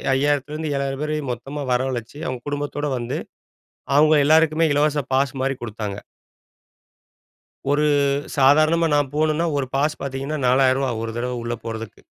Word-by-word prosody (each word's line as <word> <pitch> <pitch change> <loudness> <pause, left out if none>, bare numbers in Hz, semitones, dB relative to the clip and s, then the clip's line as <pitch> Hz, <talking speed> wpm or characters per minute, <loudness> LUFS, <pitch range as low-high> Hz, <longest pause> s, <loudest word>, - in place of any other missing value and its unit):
5,000 145 0 +2
த்திருந்து 155 0 -4
7,000 135 +1 -2
பேரையும் 150 -4 -2
மொத்தமா 140 +5 -6
வரவழைச்சு, 125 0 -2
அவுங்க 130 -1 -4
குடும்பத்தோட 145 0 -3
வந்து 120 +1 -3 0.8
அவுங்க 155 +1 +6
எல்லாருக்குமே 160 +1 +4
இலவச 150 0 +2
பாஸ்மாரி 135 0 0
குடுத்தாங்க. 105 -3 -5 1.7
ஒரு 150 +1 +2 0.5
சாதாரணமா 155 +5 +4
நான் 145 -2 +1
போணும்னா 155 +2 +1
ஒரு 130 -2 -1
பாஸ் 150 +3 0
பார்த்தீங்கன்னா 140 +2 -3
ரூ.4,000 130 0 +3
ஒரு 115 - -3
தடவ 125 +1 -2
உள்ள 120 0 -2
போறதுக்கு. 115 -1 -6
140 Hz, 130 wpm, -22 LUFS, 130-150 Hz, 1.7 s, அவுங்க